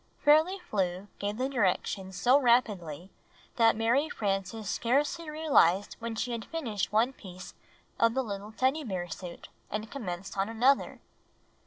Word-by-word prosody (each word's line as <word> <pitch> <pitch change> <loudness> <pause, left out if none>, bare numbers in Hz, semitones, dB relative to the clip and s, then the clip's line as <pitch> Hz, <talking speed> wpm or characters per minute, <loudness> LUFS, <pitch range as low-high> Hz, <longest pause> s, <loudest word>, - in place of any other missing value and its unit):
Fairly 315 +6 +5
Flew 195 - -2
gave 205 +1 -2
the 255 +2 0
directions 190 -5 -1
so 255 +3 +5
rapidly 200 - +1 0.5
that 225 -1 +5
Mary 240 +8 +2
Frances 200 +1 -2
scarcely 290 - 0
realized 270 - +3
when 230 -1 -4
she 240 +2 -2
finished 225 -8 -3
one 230 +5 +2
piece 185 -6 -11 0.5
of 230 +1 +3
the 265 - +1
Httle 205 -1 -6
Teddy 270 +4 +1
Bear 185 -7 -3
suit 175 -1 -8 0.2
and 215 +1 -4
commenced 195 -7 -5
on 195 +2 +1
another. 250 +5 +2
225 Hz, 140 wpm, -29 LUFS, 195-265 Hz, 0.5 s, Fairly